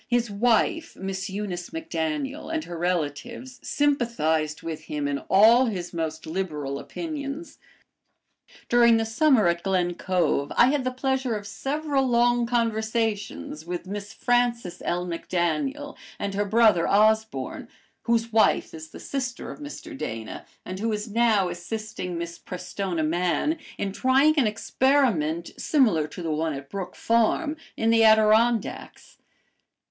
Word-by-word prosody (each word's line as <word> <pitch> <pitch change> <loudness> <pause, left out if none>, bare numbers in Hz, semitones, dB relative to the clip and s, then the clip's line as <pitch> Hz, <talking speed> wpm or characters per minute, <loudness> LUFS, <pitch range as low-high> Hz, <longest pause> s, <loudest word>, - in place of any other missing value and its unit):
His 240 -2 +1
wife, 235 +9 +1
Miss 195 +1 -4
Eunice 190 -3 -4
MacDaniel, 270 - -3
and 320 -1 -1
her 175 - -7
relatives 180 - -3
sympathized 165 - 0
with 160 -1 -6
him 145 -1 -3
in 140 -1 -1
all 230 +6 +6
his 185 -6 -4
most 160 -1 -3
liberal 155 -5 -3
opinions. 305 - -6 1.1
During 235 -1 +5
the 225 - 0
summer 230 - +3
at 170 0 +1
Glen 180 -2 0
Cove 170 -6 0
I 250 +2 +6
had 285 -3 0
the - - +2
pleasure 260 -2 -1
of 205 -1 -6
several 275 +5 -1
long 240 0 +3
conversations 220 - -1
with 175 +1 -5
Miss 200 +1 -6
Frances 240 -6 0
L. 175 +1 -1
MacDaniel 175 - -2 0.2
and 200 - -3
her 205 +1 0
brother 215 -4 +4
Osborne, 220 +2 +1 0.4
whose 230 -1 +1
wife 220 - +3
is 160 -1 -9
the - - -11
sister 255 -3 -4
of - - -10
Mr. 300 +1 -8
Dana, 110 - -6 0.2
and 185 +1 -6
who 225 +2 -1
is 210 0 -4
now 220 -4 +3
assisting 180 0 -5
Miss 170 0 -6
Prestona 180 -1 -4
Mann 180 - 0 0.2
in 195 - -2
trying 265 +8 +4
an 245 - +3
experiment, 210 - +1
similar 215 - +2
to 170 +4 -8
the 165 - -2
one 155 +1 -1
at 140 0 -9
Brook 195 -2 -5
Farm, 235 +7 +1 0.2
in 225 0 +2
the 225 0 +5
Adirondacks. 220 +1 +2
215 Hz, 140 wpm, -25 LUFS, 175-245 Hz, 1.1 s, all